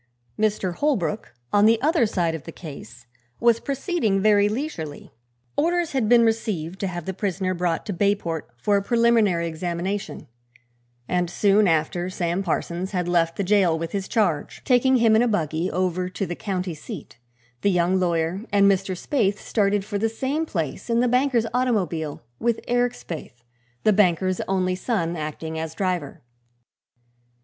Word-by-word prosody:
Mr. 210 -4 0
Holbrook, 205 - -1 0.2
on 205 +1 +6
the 225 0 +4
other 300 -2 +3
side 175 -6 0
of 160 - -5
the 165 - -7
case, 120 -8 -10 0.3
was 235 -1 +4
proceeding 275 - 0
very 205 0 +4
leisurely. 210 - -5 0.4
Orders 345 +1 +1
had 255 -6 0
been 235 -1 +6
received 195 -6 -1
to 195 - -1
have 175 -3 -5
the 190 - -3
prisoner 190 -1 -1
brought 175 -2 -1
to 205 - -3
Bayport 180 -4 -1
for 200 - +2
a - - +1
preliminary 225 -6 +3
examination, 175 +5 -4 0.8
and 180 -1 0
soon 205 +3 +3
after 165 +2 0
Sam 175 0 -1
Parsons 180 +1 -2
had 180 -2 -1
left 170 -1 +2
the 200 - -1
jail 185 -4 +3
with 165 0 -4
his 195 -1 -3
charge, 185 -10 -1
taking 260 +1 +4
him 230 -3 +4
in 220 - +5
a 245 - +3
buggy 165 -5 0
over 180 0 -1
to 195 +2 -3
the 175 - -4
county 185 -4 -3
seat, 145 -5 -9 0.4
the 200 - +3
young 180 0 +2
lawyer 170 +1 0
and 200 -1 +4
Mr. 195 -1 +2
Spaythe 205 -3 0
started 205 -2 0
for 205 -1 -3
the 225 +2 +1
same 275 +8 -2
place 165 - -4
in 230 0 +2
the 250 - +3
banker's 250 -1 +2
automobile 180 - -1 0.2
with 235 -1 +1
Eric 245 0 +2
Spaythe, 150 - -9 0.4
the 215 - +4
banker's 185 -2 +2
only 185 -1 +1
son, 180 -3 -1
acting 160 +1 -5
as 160 0 -5
driver. 180 -9 -2
190 Hz, 165 wpm, -24 LUFS, 170-220 Hz, 0.8 s, on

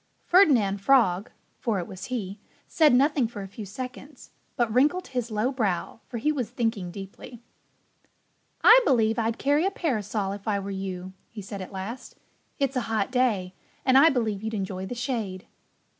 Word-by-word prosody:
Ferdinand 250 - +4
Frog 205 -5 +3 0.3
(for 225 -4 -1
it 175 - -3
was 185 0 -8
he) 205 -5 -4 0.3
said 310 -2 +4
nothing 275 0 +3
for 210 -3 -7
a - - -7
few 205 +1 -9
seconds, 255 +6 -9 0.2
but 235 -3 0
wrinkled 300 +9 +2
his 245 -2 -3
low 215 +4 0
brow; 215 -6 -2
for 240 - -5
he 300 +7 +1
was 255 -8 -2
thinking 225 -7 -2
deeply. 195 +5 -10 1.2
"I 470 +2 +9
believe 225 - +2
I'd 225 0 0
carry 290 +3 +2
a 385 - +2
parasol 215 - -2
if 200 +2 -8
I 210 -2 +1
were 200 0 -5
you," 190 -1 -5 0.2
he 210 -3 -9
said 200 0 -7
at 185 - -8
last. 205 +6 -7 0.4
"It's 275 -1 0
a 255 - +1
hot 220 0 0
day 220 -8 +1 0.3
and 260 - +4
I 285 +5 +8
believe 220 -7 -1
you'd 220 0 -3
enjoy 190 -1 -4
the 245 - -5
shade." 225 -7 -3
225 Hz, 175 wpm, -26 LUFS, 195-255 Hz, 1.2 s, I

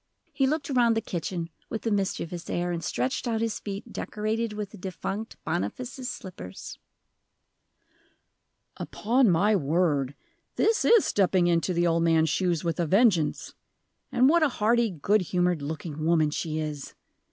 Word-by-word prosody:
He 270 - +2
looked 295 0 -1
around 240 -3 +3
the - - +1
kitchen 170 -2 -4 0.2
with 225 - -5
a 225 - +1
mischievous 180 -3 -2
air, 175 0 -1
and 170 -1 -3
stretched 125 - -2
out 225 -2 0
his 225 -1 -1
feet 200 -1 -7
decorated 220 +2 -2
with 210 -1 -5
the - - -11
defunct 195 +4 -5
Boniface's 250 +9 -3
slippers. 95 - -8 2.0
"Upon 240 +2 +1
my 200 +5 +3
word, 145 -4 +1 0.4
this 450 +1 +2
is 460 -3 +6
stepping 190 -2 +2
into 170 +1 +2
the 175 0 +1
old 165 -1 +2
man's 160 -1 +3
shoes 175 -3 0
with 165 -2 -2
a 170 - +1
vengeance! 190 -4 +2 0.6
And 255 +2 +4
what 335 +4 +4
a 310 - +4
hearty, 235 0 +2
good 195 +4 +1
humored 180 -2 0
looking 155 +1 -5
woman 160 -2 +3
she 155 +1 -3
is! 150 -2 -5
180 Hz, 150 wpm, -27 LUFS, 165-225 Hz, 2.0 s, is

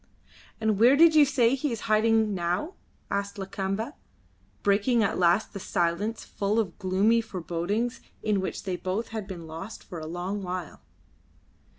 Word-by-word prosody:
"And 220 -2 +1
where 245 +5 +7
did 325 +2 +7
you 305 -2 +7
say 255 -3 +3
he 275 +1 -1
is 230 - -4
hiding 220 0 +3
now?" 180 - -1 0.4
asked 200 0 -2
Lakamba, 195 +5 -3 0.7
breaking 210 +4 +3
at 200 - 0
last 175 +4 +3
the 200 - -5
silence 180 +6 -1
full 205 +2 -1
of 200 -5 -2
gloomy 205 +4 +3
forebodings 200 +4 -2 0.2
in 210 -3 +1
which 190 - -4
they 185 -2 -2
both 190 +6 -3
had 220 -3 -5
been 175 -4 -7
lost 165 +7 -8
for 175 -4 -8
a 155 - -6
long 180 +5 -3
while. 180 -3 -5
205 Hz, 160 wpm, -27 LUFS, 185-225 Hz, 0.7 s, where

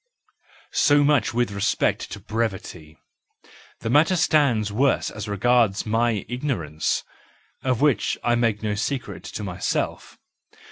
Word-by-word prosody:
So 145 0 +4
much 145 -3 +2
with 120 -2 0
respect 100 -1 0
to - - -6
brevity; 95 -8 -4 0.8
the 115 - -3
matter 155 +7 +4
stands 140 - +2
worse 135 +5 +1
as 105 0 -7
regards 110 0 +2
my 115 -1 0
ignorance, 90 - -2 0.6
of 130 -2 0
which 145 -8 +2
I 120 - +2
make 115 -3 +1
no 105 -1 0
secret 125 +5 -3
to 105 - -6
myself. 90 -3 -3
115 Hz, 125 wpm, -23 LUFS, 105-130 Hz, 0.8 s, So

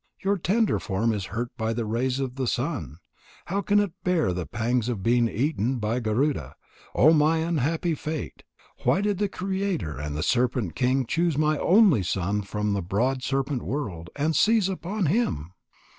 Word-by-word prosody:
Your 200 0 +1
tender 215 +6 +1
form 110 +3 0
is 100 -3 -3
hurt 120 +5 -4
by 110 0 -1
the 115 0 -2
rays 125 +4 -1
of 130 -2 -2
the 130 -1 -2
sun. 120 - -2 0.5
How 195 +3 -1
can 205 +1 +3
it 205 -3 0
bear 175 - +1
the 90 -3 -4
pangs 120 - 0
of 105 -6 -3
being 120 +1 +3
eaten 130 0 0
by 115 +2 -1
Garuda? 115 - -1 0.4
Oh, 155 +4 +6
my 155 +1 +4
unhappy 165 +1 0
fate! 155 0 -5 0.4
Why 190 - +3
did 205 -2 0
the 205 -1 +1
Creator 190 - -2
and 75 0 -4
the 80 - -1
serpent 120 -5 +1
king 130 +1 +1
choose 165 +3 0
my 155 0 +2
only 190 - +5
son 95 +3 -1
from 105 +1 -2
the 100 - -1
broad 120 +9 0
serpent 135 0 -1
world, 95 - -4
and 155 +2 0
seize 215 +2 +4
upon 190 +2 -2
him?" 140 - 0
130 Hz, 175 wpm, -26 LUFS, 110-165 Hz, 0.5 s, Oh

